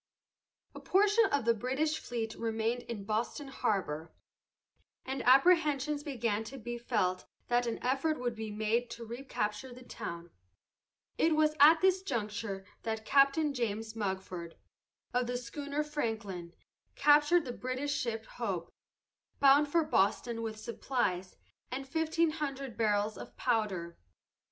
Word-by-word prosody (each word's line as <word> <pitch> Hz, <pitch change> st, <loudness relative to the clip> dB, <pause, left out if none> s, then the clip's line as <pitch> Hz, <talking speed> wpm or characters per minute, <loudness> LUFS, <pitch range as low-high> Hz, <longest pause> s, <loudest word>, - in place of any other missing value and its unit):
A -, -, -8 dB
portion 415 Hz, +3 st, +4 dB
of 285 Hz, -, 0 dB
the 235 Hz, -, +5 dB
British 265 Hz, +7 st, -1 dB
fleet 225 Hz, -2 st, -4 dB
remained 225 Hz, +1 st, -1 dB
in 215 Hz, -4 st, -4 dB
Boston 225 Hz, +7 st, -2 dB
harbor, 165 Hz, -, -2 dB, 0.9 s
and 265 Hz, +1 st, -3 dB
apprehensions 295 Hz, 0 st, +4 dB
began 235 Hz, -7 st, -1 dB
to 270 Hz, +4 st, -8 dB
be 240 Hz, 0 st, -5 dB
felt 185 Hz, -6 st, 0 dB, 0.2 s
that 240 Hz, 0 st, +2 dB
an 230 Hz, -, -1 dB
effort 275 Hz, +4 st, +1 dB
would 245 Hz, -1 st, -1 dB
be 220 Hz, -1 st, -5 dB
made 220 Hz, +3 st, 0 dB
to 235 Hz, 0 st, -7 dB
recapture 235 Hz, -1 st, -4 dB
the 250 Hz, +1 st, -11 dB
town. 170 Hz, -8 st, -7 dB, 0.9 s
It 320 Hz, -1 st, +4 dB
was 305 Hz, 0 st, +3 dB
at 315 Hz, +3 st, +8 dB
this 375 Hz, 0 st, +4 dB
juncture 210 Hz, -, -3 dB, 0.2 s
that 220 Hz, -1 st, -3 dB
Captain 280 Hz, +3 st, +4 dB
James 220 Hz, -3 st, -3 dB
Mugford, 190 Hz, -5 st, -4 dB, 0.6 s
of 245 Hz, 0 st, +1 dB
the 245 Hz, 0 st, -1 dB
schooner 285 Hz, +4 st, -3 dB
Franklin, 220 Hz, -, -4 dB, 0.4 s
captured 295 Hz, +3 st, +5 dB
the 245 Hz, -, -4 dB
British 255 Hz, +4 st, -2 dB
ship 225 Hz, -4 st, -2 dB
Hope, 195 Hz, -9 st, -4 dB, 0.7 s
bound 280 Hz, +2 st, +6 dB
for 330 Hz, +3 st, +2 dB
Boston 230 Hz, -1 st, +1 dB
with 220 Hz, -1 st, -4 dB
supplies 215 Hz, -5 st, -2 dB, 0.3 s
and 270 Hz, +1 st, -5 dB
fifteen 320 Hz, +2 st, +1 dB
hundred 275 Hz, -5 st, -4 dB
barrels 210 Hz, -1 st, +1 dB
of -, -, -10 dB
powder. 190 Hz, -7 st, -1 dB
240 Hz, 135 wpm, -32 LUFS, 215-285 Hz, 0.9 s, at